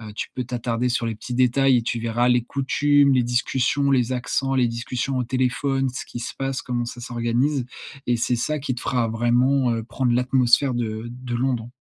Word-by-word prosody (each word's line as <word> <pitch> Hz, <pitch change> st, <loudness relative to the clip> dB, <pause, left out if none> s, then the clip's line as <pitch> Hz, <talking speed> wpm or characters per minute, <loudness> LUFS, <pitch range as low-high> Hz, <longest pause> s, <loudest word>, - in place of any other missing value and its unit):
Heu, 110 Hz, -2 st, -9 dB
tu -, -, -4 dB
peux 125 Hz, -, -3 dB
t'attarder 120 Hz, 0 st, -2 dB
sur 120 Hz, -1 st, 0 dB
les 115 Hz, -, -2 dB
petits 125 Hz, +3 st, -6 dB
détails 130 Hz, +1 st, +4 dB
et -, -, -1 dB
tu 120 Hz, +1 st, -2 dB
verras 115 Hz, +2 st, +1 dB
les 125 Hz, -1 st, +3 dB
coutumes, 140 Hz, +2 st, +2 dB
les 125 Hz, -, +3 dB
discussions, 130 Hz, +3 st, +1 dB
les 130 Hz, -2 st, +2 dB
accents, 135 Hz, +2 st, -1 dB
les 125 Hz, -2 st, +3 dB
discussions 120 Hz, +3 st, -3 dB
au 125 Hz, -, 0 dB
téléphone, 130 Hz, +2 st, 0 dB
ce 125 Hz, -, -6 dB
qu'il 120 Hz, -, -7 dB
se -, -, -5 dB
passe, 135 Hz, -1 st, -2 dB
comment 120 Hz, -2 st, -2 dB
ça 120 Hz, +1 st, -7 dB
s'organise. 120 Hz, +3 st, -1 dB, 0.4 s
Et 120 Hz, -, +2 dB
c'est 120 Hz, +1 st, 0 dB
ça 150 Hz, +6 st, -1 dB
qui 135 Hz, -2 st, -2 dB
te -, -, -6 dB
fera 120 Hz, -3 st, 0 dB
vraiment, 120 Hz, +3 st, +2 dB
heu, 115 Hz, -1 st, -2 dB
prendre 125 Hz, +1 st, -1 dB
l'atmosphère 125 Hz, +1 st, +3 dB
de 115 Hz, -1 st, -3 dB
de 125 Hz, 0 st, -6 dB
Londres. 120 Hz, -2 st, -1 dB
125 Hz, 210 wpm, -23 LUFS, 120-130 Hz, 0.4 s, détails